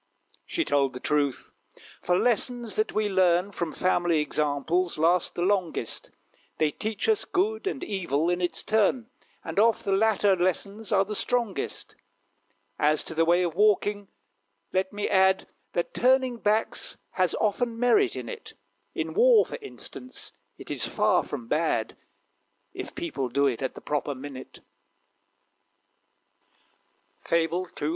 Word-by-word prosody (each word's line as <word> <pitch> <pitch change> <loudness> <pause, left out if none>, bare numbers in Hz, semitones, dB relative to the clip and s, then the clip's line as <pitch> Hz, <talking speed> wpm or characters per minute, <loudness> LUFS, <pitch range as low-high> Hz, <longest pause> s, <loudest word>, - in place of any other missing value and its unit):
She 335 - -1
told 140 -2 +1
the 125 - -6
truth 145 -1 -1 0.5
for 180 - +2
lessons 240 0 0
that 215 0 +1
we 215 0 0
learn 185 -1 +2
From 170 -4 -3
family 175 -2 +1
examples 150 +4 0
last 165 +3 +2
the 175 - -1
longest. 185 - -1 0.5
They 155 -1 +2
teach 220 - -3
us 440 -2 +3
good 415 +2 -1
and 335 - -3
evil, 170 -6 -1
in 175 +1 0
its 175 - -1
turn; 225 +3 +1 0.3
And - - -2
oft 225 +1 +3
the 200 - 0
latter 205 -1 +3
lessons 200 +5 -2
are 195 -2 +4
the 210 - -5
strongest. 235 -1 -2 0.8
As 150 0 +2
to - - -5
the 165 +1 +2
way 175 +2 +4
of 170 -2 -1
walking, 205 +1 +2 0.7
let 190 0 0
me 205 0 -2
add, 190 0 +3 0.3
That 175 - -2
turning 255 0 +3
backs 215 0 0
has 185 -2 +1
often 230 +2 0
merit 245 - +3
in - - -6
it 455 -3 -8 0.4
In - - -3
war, 470 -1 +6
for - - -7
instance, 415 -1 -8 0.3
it - - -9
is - - -1
far - - +2
from 235 - -6
bad, - - 0 0.8
If - - -7
people 320 - -3
do 140 +3 +2
it 130 -3 0
at 130 - -3
the - - -9
proper 145 -1 -2
minute. 130 0 -9 2.6
FABLE 170 +2 0
CCXXVI. 150 - -4
190 Hz, 145 wpm, -27 LUFS, 165-230 Hz, 2.6 s, war